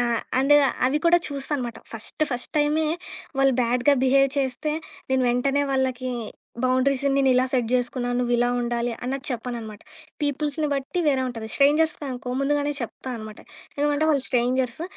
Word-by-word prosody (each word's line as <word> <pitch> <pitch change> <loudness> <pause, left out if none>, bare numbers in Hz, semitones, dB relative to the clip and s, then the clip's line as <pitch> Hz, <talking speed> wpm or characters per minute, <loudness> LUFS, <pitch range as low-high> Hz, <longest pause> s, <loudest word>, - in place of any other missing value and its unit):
ఆ! - - +3 0.4
అంటే 290 +2 +5 0.3
అవి 290 +4 +1
కూడా 345 +1 +6
చూస్తా 280 +1 -5
అనమాట. 240 -3 -5 0.2
ఫస్టు 225 +7 -2
ఫస్ట్ 245 +5 -5
టైమే 300 +1 +2 0.5
వాళ్ళు 270 -1 +4
బ్యాడ్‌గా 245 +4 +3
బిహేవ్ 275 +1 +4
చేస్తే 265 +2 -1 0.4
నేను 260 -1 +2
వెంటనే 275 +3 +1
వాళ్ళకి 255 -1 0 0.5
బౌండరీస్ 260 +2 +2
నేనిలా 260 -2 +4
సెట్ 245 -4 0
చేసుకున్నాను, 245 0 -1
నువ్విలా 245 0 +2
ఉండాలి 240 0 -1
అన్నట్టు 265 +1 -3
చెప్పననమాట. 230 -3 -5 0.4
పీపుల్స్‌ని 295 +1 -1
బట్టి 280 +6 -2
వేరే 270 -3 +3
ఉంటది. 225 -2 -6
స్ట్రేంజర్స్ 300 +3 +4
అనుకో 250 0 -5
ముందుగానే 290 +1 +1
చెప్తా 250 +2 -6
అనమాట. 215 -1 -9 0.4
ఎందుకంటే 295 +1 +1
వాళ్ళు 280 -3 +2
స్ట్రేంజర్స్, 250 +3 0
260 Hz, 145 wpm, -24 LUFS, 245-285 Hz, 0.5 s, కూడా